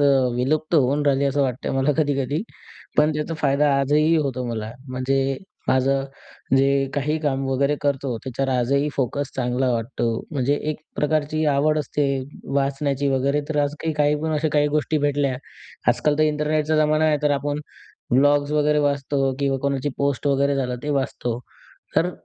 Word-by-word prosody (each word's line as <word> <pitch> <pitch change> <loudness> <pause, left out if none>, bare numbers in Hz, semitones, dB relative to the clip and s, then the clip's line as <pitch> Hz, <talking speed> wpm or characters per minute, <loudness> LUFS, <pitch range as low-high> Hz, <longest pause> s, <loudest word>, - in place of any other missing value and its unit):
अ, - - +4 0.3
विलुप्त 155 +7 0
होऊन 145 0 +3
राहिली 140 0 +3
असं 140 +1 +1
वाटतं 130 -1 -2
मला 135 +2 +2
कधी-कधी. 145 +1 0 0.5
पण 150 +1 +4
त्याचा 150 +2 -3
फायदा 145 -1 +2
आजही 150 +4 +3
होतो 135 -5 -1
मला. 110 -2 -4 0.2
म्हणजे 135 +1 0 0.3
माझं 135 +1 +2 0.5
जे 135 +1 +4 0.3
काही 150 +2 0
काम 135 -3 -1
वगैरे 140 +2 +1
करतो 140 -3 -1
त्याच्यावर 135 +1 -2
आजही 140 +4 +1
फोकस 140 +1 -1
चांगला 125 0 0
वाटतो. 115 +2 -2 0.3
म्हणजे 140 -2 +1 0.2
एक 155 - -5 0.2
प्रकारची 155 +1 0
आवड 155 +2 +2
असते 150 0 -1 0.5
वाचण्याची 140 0 0
वगैरे 140 +2 +1
तर 155 -2 -1
आज 145 0 -1
काही-काही 150 -2 +1
पण 160 0 -1
अशा 155 +1 +1
काही 150 0 +3
गोष्टी 155 +1 +1
भेटल्या. 140 -2 0 0.5
आजकाल 150 -1 +2
तर - - +4
इंटरनेटचा 155 0 +1
जमाना 155 0 +3
आहे 155 -1 +3
तर 150 - +3
आपण 145 +1 -3 0.5
ब्लॉग्स 145 +2 +3
वगैरे 150 0 +2
वाचतो 140 -1 0
किंवा 140 -1 0
कोणाची 140 0 0
पोस्ट 140 0 0
वगैरे 140 0 +2
झालं 125 -2 -1
ते 150 - -2
वाचतो. 120 -3 -3 0.6
तर 165 +3 +3
140 Hz, 160 wpm, -23 LUFS, 135-150 Hz, 0.6 s, अ